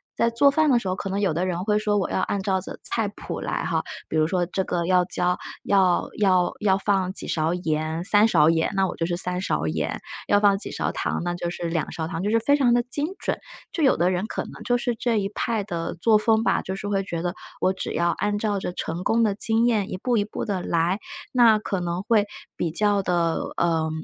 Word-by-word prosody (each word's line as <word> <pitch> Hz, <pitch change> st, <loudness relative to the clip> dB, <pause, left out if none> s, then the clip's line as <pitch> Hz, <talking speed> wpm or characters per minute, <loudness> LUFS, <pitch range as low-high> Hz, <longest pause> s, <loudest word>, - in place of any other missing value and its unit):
在 230 Hz, -, +2 dB
做 255 Hz, +5 st, +5 dB
饭 310 Hz, +1 st, +3 dB
的 255 Hz, -, +5 dB
时 200 Hz, -, -6 dB
候， 185 Hz, -, 0 dB
可 195 Hz, -, -5 dB
能 195 Hz, +1 st, -1 dB
有 195 Hz, -5 st, +1 dB
的 170 Hz, +3 st, -1 dB
人 180 Hz, 0 st, -2 dB
会 210 Hz, +1 st, +2 dB
说， 210 Hz, -1 st, +1 dB
我 195 Hz, -, 0 dB
要 -, -, 0 dB
按 200 Hz, -, -1 dB
照 190 Hz, -1 st, +1 dB
着 -, -, -7 dB
菜 225 Hz, -2 st, 0 dB
谱 205 Hz, -, -7 dB
来 -, -, -2 dB
哈。 -, -, 0 dB, 0.2 s
比 -, -, -5 dB
如 155 Hz, 0 st, +3 dB
说 175 Hz, +1 st, 0 dB
这 190 Hz, +2 st, -2 dB
个 170 Hz, -1 st, -1 dB
要 180 Hz, 0 st, +4 dB
加 180 Hz, 0 st, 0 dB, 0.3 s
要 190 Hz, -3 st, +3 dB
要 185 Hz, -3 st, +3 dB
要 195 Hz, -2 st, +3 dB
放 195 Hz, -2 st, 0 dB
几 -, -, -2 dB
勺 160 Hz, 0 st, 0 dB
盐， 160 Hz, -1 st, -2 dB
3 205 Hz, +3 st, +4 dB
勺 155 Hz, -8 st, +4 dB
盐， 160 Hz, 0 st, +1 dB
那 195 Hz, 0 st, +3 dB
我 185 Hz, -, -4 dB
就 165 Hz, -, -2 dB
是 175 Hz, -1 st, -2 dB
3 180 Hz, 0 st, -1 dB
勺 80 Hz, -, -1 dB
盐， 80 Hz, -1 st, -2 dB, 0.3 s
要 205 Hz, -, +4 dB
放 205 Hz, -1 st, +4 dB
几 -, -, -2 dB
勺 -, -, -2 dB
糖， -, -, -2 dB
那 175 Hz, 0 st, -1 dB
就 175 Hz, 0 st, -3 dB
是 175 Hz, -, -6 dB
2 165 Hz, -1 st, -2 dB
勺 160 Hz, -1 st, -4 dB
糖， 165 Hz, 0 st, -4 dB
就 200 Hz, -, -1 dB
是 225 Hz, +1 st, +3 dB
非 285 Hz, +6 st, +3 dB
常 250 Hz, -4 st, +3 dB
的 240 Hz, -, +2 dB
精 285 Hz, +5 st, -2 dB
准。 -, -, -2 dB, 0.4 s
就 330 Hz, -, -2 dB
有 270 Hz, -, +4 dB
的 175 Hz, +2 st, +2 dB
人 185 Hz, +3 st, -1 dB
可 -, -, -3 dB
能 -, -, -11 dB
就 245 Hz, -, +2 dB
是 240 Hz, 0 st, -1 dB
这 230 Hz, -1 st, 0 dB
一 195 Hz, -, -1 dB
派 220 Hz, 0 st, -2 dB
的 170 Hz, -4 st, -4 dB
作 220 Hz, +6 st, +3 dB
风 220 Hz, 0 st, +3 dB
吧， -, -, +2 dB
就 190 Hz, -, -5 dB
是 200 Hz, +1 st, -5 dB
会 200 Hz, -1 st, 0 dB
觉 170 Hz, -3 st, -4 dB
得， 175 Hz, -1 st, -1 dB, 0.3 s
我 185 Hz, -, +2 dB
只 190 Hz, -, -5 dB
要 170 Hz, 0 st, +1 dB
按 205 Hz, 0 st, -1 dB
照 205 Hz, -1 st, -1 dB
着 185 Hz, -, -4 dB
成 170 Hz, 0 st, -4 dB
功 230 Hz, +3 st, +2 dB
的 210 Hz, -3 st, +2 dB
经 225 Hz, +3 st, +3 dB
验 215 Hz, -5 st, +1 dB
一 -, -, -3 dB
步 245 Hz, +5 st, 0 dB
一 205 Hz, -, +2 dB
步 210 Hz, -, -5 dB
地 195 Hz, -4 st, -2 dB
来， 170 Hz, +3 st, 0 dB, 0.3 s
那 235 Hz, -4 st, +6 dB
可 200 Hz, -2 st, -3 dB
能 175 Hz, +1 st, -3 dB
会 210 Hz, -1 st, +2 dB, 0.3 s
比 170 Hz, -, -1 dB
较 205 Hz, +4 st, +2 dB
的 175 Hz, -3 st, 0 dB, 0.2 s
呃 165 Hz, -2 st, +1 dB
190 Hz, 265 characters per minute, -24 LUFS, 175-215 Hz, 0.4 s, 那